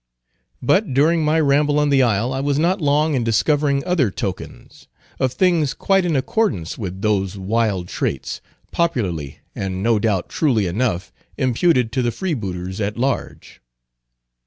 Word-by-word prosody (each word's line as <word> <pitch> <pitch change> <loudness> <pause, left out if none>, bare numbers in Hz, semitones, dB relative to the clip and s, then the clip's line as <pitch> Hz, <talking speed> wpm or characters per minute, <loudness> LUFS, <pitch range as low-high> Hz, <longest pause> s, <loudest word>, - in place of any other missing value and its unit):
"But 145 - +2
during 160 +4 +3
my 155 +2 +2
ramble 145 0 +2
on 150 0 +2
the 135 -1 +4
isle 120 +1 +1
I 130 - -2
was 140 0 0
not 175 +5 +1
long 150 +1 +2
in 130 -4 0
discovering 140 +5 +1
other 165 - +2
tokens, - - -7 0.3
of 130 -2 +1
things 170 -7 +2
quite 195 -2 +2
in 165 -3 0
accordance 130 - -1
with 95 -2 -6
those 100 -2 0
wild 100 -2 -1
traits, 70 -6 -3 0.3
popularly, 95 - -2
and 95 -1 -4
no 115 -1 +3
doubt 100 -5 0
truly 120 -10 +1
enough, 95 0 -2 0.2
imputed 130 -1 +2
to 130 - 0
the 120 - +1
freebooters 100 - -4
at 105 +2 -2
large. 130 +2 -3
130 Hz, 150 wpm, -20 LUFS, 100-150 Hz, 0.3 s, the